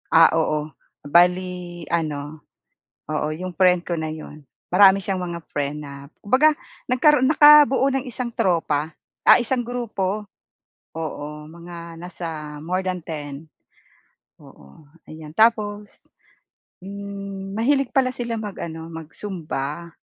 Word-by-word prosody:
Ah, 165 0 +8
oo. 155 -2 0 0.4
Bale 175 +1 +1
ano 155 -2 -3 0.6
oo, 150 0 -2
'yong 180 +4 -5
friend 180 -1 +3
ko 175 - -2
na 160 -1 -3
'yon, 155 -1 -9 0.3
marami 195 +1 +7
siyang 190 -1 -3
mga 170 -1 -4
friend 145 0 -2
na 140 0 -10
kumbaga, 260 +9 +4 0.4
nagkaroon 260 +1 +4
nakabuo 295 -3 +7
ng 270 0 -2
isang 240 0 -4
tropa, 160 -6 0 0.3
ah, - - +8
isang 245 +1 0
grupo. 215 -4 -3 0.7
Oo, 150 -1 -6
mga 170 0 -10
nasa 165 -4 -7
more 185 +3 -1
than 180 -1 -1
10. 150 -1 -7 0.9
Oo. 70 - -17 0.2
Ayan. 155 -1 -10
Tapos, 210 -1 +2 0.9
mm, 200 0 -7
mahilig 275 +3 +2
pala 260 -2 +3
sila 235 -1 -3
mag-ano, 165 -6 -6
mag-zumba. 165 -2 -6
180 Hz, 115 wpm, -22 LUFS, 155-210 Hz, 0.9 s, Ah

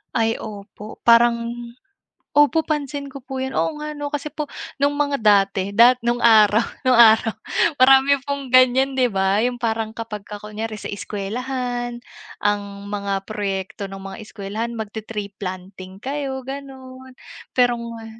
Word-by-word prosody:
Ay, 225 -1 +1
opo. 210 0 -9
Parang 235 0 +6 1.0
opo, 295 +2 +5
pansin 285 -2 -3
ko 275 - -8
po 265 -2 -5
yun. 265 0 -4
Oo 300 -2 -1
nga 300 0 -5
'no, 290 0 -5
kasi 290 +1 -3
po 300 -1 -4 0.3
nung 285 +1 +2
mga 285 -1 0
dati, 200 -2 +2
da 245 +3 +7
nung 240 0 +1
araw, 215 -1 +6 0.2
nung 255 - +5
araw 225 -1 +6 0.5
marami 270 +2 +6
pong 280 -1 -4
ganyan, 255 +1 +5
'di 255 -2 +2
ba? 195 +1 +1
Yung 245 0 0
parang 225 -2 -1
kapag 225 -3 -6
ka 210 -1 -6
kunyari, 215 +1 -6
sa - - -8
eskuwelahan, 240 +4 -4 0.4
ang 205 0 +1 0.2
mga 200 -1 -3
proyekto 200 -1 -4
ng 195 - -7
mga 195 +3 -8
eskuwelahan, 215 +3 -5
mag-te-tree 210 -1 -6
planting 185 0 -7
kayo 265 +1 -4
ganun. 260 -1 -9 0.5
Pero 245 -1 +4
nga 230 -1 -8
230 Hz, 150 wpm, -21 LUFS, 205-265 Hz, 1.0 s, da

